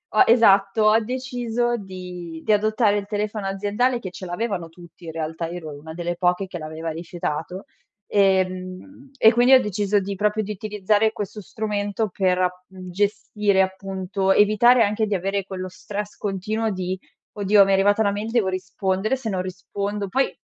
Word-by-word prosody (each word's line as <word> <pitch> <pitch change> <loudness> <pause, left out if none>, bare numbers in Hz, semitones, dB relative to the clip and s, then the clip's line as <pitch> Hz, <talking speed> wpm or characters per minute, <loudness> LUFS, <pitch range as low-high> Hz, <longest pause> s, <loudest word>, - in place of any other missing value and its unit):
ho - - +8
esatto, 215 -2 +5
ho 215 +1 +6
deciso 245 -1 -2
di 180 -4 -8
di 215 - +4
adottare 215 0 +2
il 200 - -3
telefono 210 -1 -3
aziendale, 210 +6 0
che 190 - -6
ce 185 - -8
l'avevano 175 -2 -3
tutti 170 0 -15
in 160 - -5
realtà, 165 +1 -3
io 175 +1 -6
ero 155 -3 -7
una 160 +1 -9
delle 175 0 -3
poche 180 +1 +1
che 180 - -6
l'aveva 155 +1 -5
rifiutato, 170 - -5 0.4
ehm, 190 +7 0
e 220 -1 +6
quindi 245 +3 +5
ho 260 - +8
deciso 205 0 0
di 195 +1 -4
proprio 210 +2 +1
di 210 - -5
utilizzare 210 +1 +1
questo 205 +1 -6
strumento 210 +1 -2
per 185 -1 +1
ap 180 0 -1
mhmm, 185 -1 -10
gestire 205 0 +1
appunto, 190 0 -1
evitare 225 +4 +5
anche 215 +2 0
di 205 - -1
avere 195 +1 -2
quello 185 -1 -5
stress 205 +3 -6
continuo 215 +3 -2
di: 185 0 -3 0.4
"Oddio 205 0 +5
mi 195 - +1
è - - +4
arrivata 205 +3 +3
una 200 -2 +3
mail, 210 +3 -4
devo 230 -5 +2
rispondere, 190 +4 -1
se 235 -4 -5
non 185 -2 -1
rispondo..." 200 +2 -4
Poi 270 +6 0
200 Hz, 175 wpm, -23 LUFS, 185-215 Hz, 0.4 s, ho